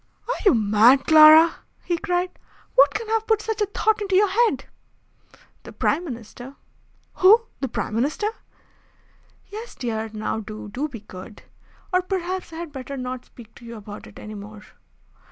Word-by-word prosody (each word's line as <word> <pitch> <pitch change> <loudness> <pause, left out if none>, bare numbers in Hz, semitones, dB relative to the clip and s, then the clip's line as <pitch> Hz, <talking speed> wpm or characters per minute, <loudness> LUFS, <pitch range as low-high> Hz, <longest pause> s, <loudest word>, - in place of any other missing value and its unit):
"Are - - 0
you 380 - +6
mad, 220 +5 +4
Clara!" 315 +1 +8 0.3
he 345 - -1
cried. 360 -1 -1 0.4
"What 280 +2 +6
can 445 +1 -3
have 445 0 0
put 440 -1 +3
such 435 0 -4
a 415 - +2
thought 425 +1 0
into 390 -2 -1
your 405 +1 +4
head?" 460 +3 +1 1.0
"The - - -12
Prime 345 - 0
Minister." 245 0 -9 0.6
"Who? 425 +5 +6 0.2
The 270 - -2
Prime 225 - -4
Minister?" 280 - -1 1.3
"Yes, 440 +3 -8
dear. 225 -3 -4
Now 215 0 -3
do, 215 -1 -8
do 270 +8 -3
be 240 -8 -10
good! 200 +1 -12 0.5
Or 365 - +4
perhaps 370 -1 -4
I - - -9
had 335 -1 -7
better 275 0 -7
not 255 0 -5
speak 230 -2 -16
to - - -17
you 235 0 -9
about 205 -1 -10
it - - -15
any 215 - -9
more." 210 +1 -10
280 Hz, 170 wpm, -23 LUFS, 225-375 Hz, 1.3 s, Clara